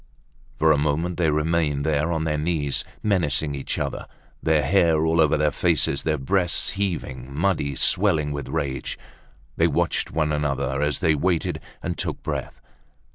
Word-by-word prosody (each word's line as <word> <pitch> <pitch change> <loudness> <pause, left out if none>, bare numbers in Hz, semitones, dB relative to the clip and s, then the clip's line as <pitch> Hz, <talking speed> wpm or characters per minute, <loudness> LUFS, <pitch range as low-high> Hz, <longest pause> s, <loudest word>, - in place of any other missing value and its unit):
For 80 0 +4
a 75 - +3
moment 80 +4 0
they 85 -3 +2
remained 75 -2 0
there, 80 +1 +1
on 80 -1 -1
their 75 -1 -1
knees, 75 -3 0 0.2
menacing 80 -7 +1
each 70 -1 -3
other. - - -3 0.3
Their 80 -2 +2
hair 80 -1 +3
all 80 +1 +3
over 75 -1 +3
their 75 0 +2
faces, 70 -5 +1
their 80 -1 0
breasts 85 +6 +1
heaving, 80 -10 -3
muddy, 75 -2 0
swelling 80 -6 +2
with 70 0 -5
rage, 70 -5 -3 0.6
they - - +4
watched - - 0
one 75 -1 0
another, 70 -2 -1
as 75 -2 0
they 80 - +4
waited 85 +3 0 0.2
and - - -3
took - - -3
breath. - - -4
75 Hz, 160 wpm, -24 LUFS, 70-85 Hz, 0.6 s, For